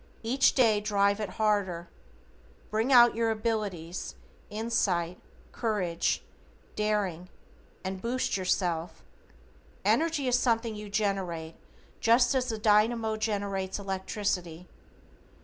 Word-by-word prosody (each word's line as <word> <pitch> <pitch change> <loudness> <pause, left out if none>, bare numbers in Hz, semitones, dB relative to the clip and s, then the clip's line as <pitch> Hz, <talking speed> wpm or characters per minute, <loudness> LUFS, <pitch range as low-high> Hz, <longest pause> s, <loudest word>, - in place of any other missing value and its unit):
Each 260 +4 +3
day 225 -5 +4
drive 200 -1 +2
it 210 -3 -3
harder. 200 -6 0 0.8
Bring 220 +5 0
out 240 -2 +8
your 230 0 0
abilities, 210 - -3 0.3
insight, 200 -6 -1 0.3
courage, 200 -8 -1 0.5
daring, 200 -5 -1 0.5
and 190 0 -4
boost 250 +2 -1
yourself. 180 -3 -1 0.8
Energy 320 -4 +2
is 250 0 +3
something 230 -2 +1
you 210 0 -8
generate 190 -6 -2 0.5
just 240 +2 +4
as 255 -1 0
the 220 - -2
dynamo 220 +1 +3
generates 200 -3 -2
electricity. 190 -3 -3
210 Hz, 100 wpm, -29 LUFS, 185-230 Hz, 0.8 s, out